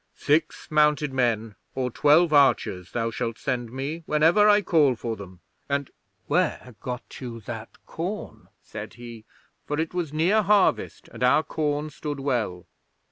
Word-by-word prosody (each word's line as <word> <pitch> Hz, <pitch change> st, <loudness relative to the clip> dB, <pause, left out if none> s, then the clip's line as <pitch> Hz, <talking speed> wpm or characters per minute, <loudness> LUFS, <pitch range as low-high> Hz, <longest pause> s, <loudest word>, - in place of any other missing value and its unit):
"Six 155 Hz, +2 st, 0 dB
mounted 150 Hz, -2 st, +3 dB
men 115 Hz, -4 st, 0 dB, 0.2 s
or 130 Hz, -1 st, -1 dB
twelve 155 Hz, +5 st, +4 dB
archers 120 Hz, -10 st, +3 dB
thou 115 Hz, -1 st, -1 dB
shalt 115 Hz, 0 st, -3 dB
send 120 Hz, -4 st, -3 dB
me 140 Hz, +6 st, -4 dB
whenever 165 Hz, +8 st, +4 dB
I 205 Hz, 0 st, +5 dB
call 150 Hz, -7 st, +3 dB
for 115 Hz, 0 st, -4 dB
them, 95 Hz, -4 st, -11 dB, 0.3 s
and 140 Hz, -1 st, -1 dB, 0.3 s
where 125 Hz, -, 0 dB
got 125 Hz, +1 st, -7 dB
you 120 Hz, -3 st, -6 dB
that -, -, -7 dB, 0.2 s
corn?" -, -, -6 dB, 0.2 s
said -, -, -8 dB
he, 115 Hz, -2 st, -10 dB, 0.4 s
for 150 Hz, +1 st, -2 dB
it 160 Hz, +1 st, -2 dB
was 175 Hz, -5 st, -2 dB
near 175 Hz, +8 st, +3 dB
harvest, 205 Hz, -1 st, +2 dB
and -, -, -12 dB
our 125 Hz, +5 st, +4 dB
corn 150 Hz, -1 st, -2 dB
stood 145 Hz, 0 st, -5 dB
well. 120 Hz, -10 st, -2 dB
140 Hz, 150 wpm, -25 LUFS, 120-155 Hz, 0.4 s, I